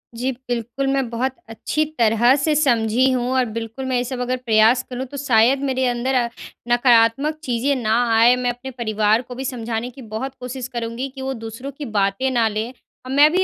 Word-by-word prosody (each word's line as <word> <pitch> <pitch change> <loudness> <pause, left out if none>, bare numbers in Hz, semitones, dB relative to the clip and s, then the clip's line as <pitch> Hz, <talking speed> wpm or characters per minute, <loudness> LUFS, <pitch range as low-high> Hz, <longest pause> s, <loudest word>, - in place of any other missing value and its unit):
जी, 250 +3 -1 0.2
बिल्कुल 245 +3 -2
मैं 270 -3 0
बहुत 255 +3 -2
अच्छी 300 +7 -1 0.2
तरह 230 +3 +4
से 295 +2 +1
समझी 245 -3 +3
हूँ 250 -1 0
और 255 -1 +3
बिल्कुल 230 +3 -5
मैं 260 -1 -1
ये 245 - 0
सब 250 0 -5
अगर 255 +1 -1
प्रयास 235 0 +3
करूँ 255 +1 -4
तो - - -5
शायद 255 -1 +3
मेरे 260 -1 0
अंदर 245 +2 -1
अ, 240 -2 +2 0.4
नकारात्मक 240 +5 +3
चीज़ें 260 +1 0
ना 225 -4 0 0.2
आए, 235 +2 +6
मैं 250 -1 -1
अपने 245 +2 -6
परिवार 220 -2 +1
को 250 0 -10
भी 265 +2 -5
समझाने 235 -2 -3
की 260 +2 -13
बहुत 265 +4 -4
कोशिश 250 0 -5
करूँगी 240 +1 -4
कि 265 - -7
वो 265 0 -2
दूसरों 230 +3 -7
की 295 - -5
बातें 200 +7 +1
ना 235 -3 +2
लें, 220 +3 -3 0.3
और 255 - -6
मैं 290 +2 +6
भी 370 +2 +2
245 Hz, 205 wpm, -21 LUFS, 230-265 Hz, 0.4 s, आए